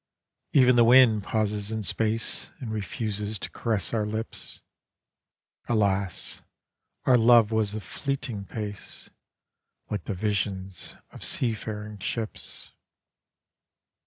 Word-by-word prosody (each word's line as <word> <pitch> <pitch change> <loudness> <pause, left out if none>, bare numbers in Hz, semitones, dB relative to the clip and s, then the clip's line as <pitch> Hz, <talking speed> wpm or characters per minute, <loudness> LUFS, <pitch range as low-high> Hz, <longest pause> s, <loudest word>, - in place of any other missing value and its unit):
<£ven 125 -3 +6
the 120 - +7
wind 115 -3 +6
pauses 105 -1 -1
in 110 -1 -2
space 110 +4 0
And 120 -6 -5
refuses 105 0 -2
to. - - -6
caress 110 -3 0
our 110 -2 +1
lips; 110 +1 -5 1.1
Alas, 100 -4 +1 0.6
our 125 -2 +5
love 115 -1 +6
was 110 -2 +1
of 110 - -5
fleeting 120 0 -4
pace 105 -1 -7 0.8
Like 105 -5 -3
the 100 - -3
visions 95 -2 -2 0.2
of - - -10
seafaring 105 -3 -1
ships. 110 +3 -5
110 Hz, 105 wpm, -27 LUFS, 100-115 Hz, 1.1 s, the